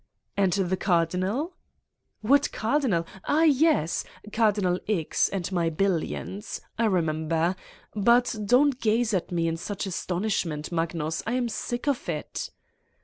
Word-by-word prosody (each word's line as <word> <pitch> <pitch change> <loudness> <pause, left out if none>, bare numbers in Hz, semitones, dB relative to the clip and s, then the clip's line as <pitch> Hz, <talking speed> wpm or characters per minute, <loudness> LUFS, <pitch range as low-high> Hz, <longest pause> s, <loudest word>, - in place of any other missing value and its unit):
" - - -57
"And 195 -3 +2
the 190 -1 0
Cardinal!" 185 - 0 0.7
"What 280 +6 +3
Cardinal? 220 - +1 0.2
Ah, 310 +3 +3
yes!... 300 - +3 0.3
Cardinal 205 -5 +2
X. 175 -8 +1
and 190 -2 -3
my 170 -3 +1
billions. 195 +3 -2 0.2
I 230 - +3
remember. 165 -2 +1 0.4
But 235 +4 +3
don 250 +7 +5
't 260 - -12
gaze 225 0 +2
at 185 -2 -1
me 170 -1 +1
in 165 0 -1
such 205 +4 -4
astonishment, 180 -4 -2
Magnus. 165 -1 -1
I 230 - 0
am 250 -1 +1
sick 240 +4 -4
of 280 -3 0
it." - - -4
195 Hz, 140 wpm, -26 LUFS, 170-240 Hz, 0.7 s, don